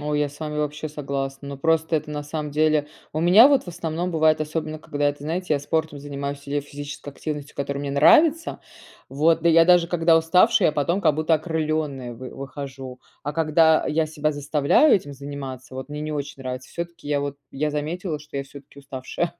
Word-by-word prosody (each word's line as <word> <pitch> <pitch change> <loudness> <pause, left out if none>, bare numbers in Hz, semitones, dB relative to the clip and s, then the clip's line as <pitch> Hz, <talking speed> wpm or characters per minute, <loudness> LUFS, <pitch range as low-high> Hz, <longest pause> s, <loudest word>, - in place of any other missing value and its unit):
О, 150 0 -3
я 150 0 +1
с 145 +3 -15
вами 150 -1 -4
вообще 150 +1 -3
согласна. 140 -2 -4
Но, 140 - -6
просто 160 +2 +1
это 150 -1 -1
на 145 -1 -4
самом 150 0 -4
деле 155 0 +2 0.2
У 155 - -2
меня 185 +8 +8
вот 280 -2 +4
в - - -11
основном 170 +1 -3
бывает, 155 -1 +3
особенно 155 0 -3
когда, 145 0 0
это, 145 0 -5
знаете, 165 +1 -1
я 140 - -1
спортом 155 -1 -2
занимаюсь 140 0 -5
или 145 - 0
физической 145 0 -8
активностью, 145 0 -6
которая 140 0 -3
мне 140 -1 -3
нравится. 310 - +4 0.5
Вот 160 +4 +2
да 170 - +4
я 165 0 +6
даже 175 -1 +5
когда 165 -1 +3
уставшая, 180 +5 +4
я - - 0
потом, 160 +6 0
как 155 - +3
будто 155 +1 +2
окрыленная 155 -5 -2
вы 125 +2 -9
выхожу. 135 -2 -8 0.2
А 145 - -3
когда 160 0 +3
я 155 +1 +1
себя 155 0 -1
заставляю 145 - +3
этим 145 -7 -7
заниматься 135 -2 -8
вот, 130 - -6
мне 150 0 -6
не 155 0 -3
очень 145 -2 -5
нравится. 130 0 -6
Всё-таки 170 -3 -7
я 145 -1 0
вот, 140 0 -4 0.2
я 150 +2 -1
заметила, 155 +2 -3
что 150 -1 -10
я 140 - -1
всё-таки 140 0 -14
уставшая 140 +5 -4
150 Hz, 200 wpm, -23 LUFS, 140-160 Hz, 0.5 s, меня